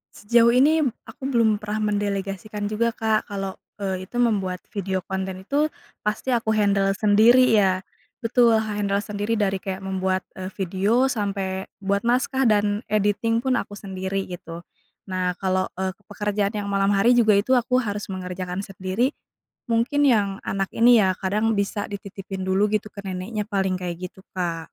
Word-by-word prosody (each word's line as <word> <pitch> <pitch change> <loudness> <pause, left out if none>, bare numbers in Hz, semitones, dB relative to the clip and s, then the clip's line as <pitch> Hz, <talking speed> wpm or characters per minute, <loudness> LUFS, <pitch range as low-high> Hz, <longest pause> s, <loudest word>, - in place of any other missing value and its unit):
Sejauh 235 +2 +4
ini, 305 +5 +5
mmm, 260 -6 +1
aku 230 +4 -12
belum 225 -5 +2
pernah 210 0 -2
mendelegasikan 205 +1 -3
juga, 230 +2 0
Kak. 220 -1 0
Kalau, 195 -1 -5 0.2
eee, 190 -1 -2
itu 240 - -14
membuat 190 -6 0
video 190 -3 -2
konten 190 0 -4
itu 290 +7 +1 0.4
pasti 215 +5 -1
aku 225 -2 +1
handle 200 -2 +2
sendiri 220 +5 +5
ya. 190 -3 +3 0.4
Betul, 230 -1 +4
ha 220 -1 -2
handle 200 -1 0
sendiri. 210 +2 -2
Dari 195 -2 0
kayak 190 0 -5
membuat, 190 0 -1 0.2
eee, 185 0 -4
video 200 +7 +1
sampai 195 -4 -2 0.2
buat 200 +1 +1
naskah 260 +2 +2
dan 205 0 +2
editing 215 +2 +1
pun 260 - +1
aku 205 - -7
sendiri 190 0 -3
gitu. 170 -1 -8 0.5
Nah, 180 -1 -1
kalau, 185 -1 0
eee, 190 0 -1 0.2
pekerjaan 205 0 -1
yang 205 -1 -3
malam 195 0 +2
hari 215 +5 +4
juga 220 -4 +5
itu 215 +6 0
aku 250 0 +3
harus 205 -1 -4
mengerjakan 180 0 -4
sendiri, 195 +7 -1 0.6
mungkin 255 +6 +2
yang 200 -5 +2
anak 195 -1 -1
ini 235 0 +6
ya 190 - +3
kadang 210 +4 0
bisa 200 0 -1
dititipin 195 -1 -6
dulu 190 +2 +3
gitu 215 0 0
ke 200 - -10
neneknya 195 +3 -3
paling 190 -3 0
kayak 175 -2 -4
gitu, 190 - -18
Kak. 175 -3 -2
205 Hz, 165 wpm, -24 LUFS, 190-220 Hz, 0.6 s, ini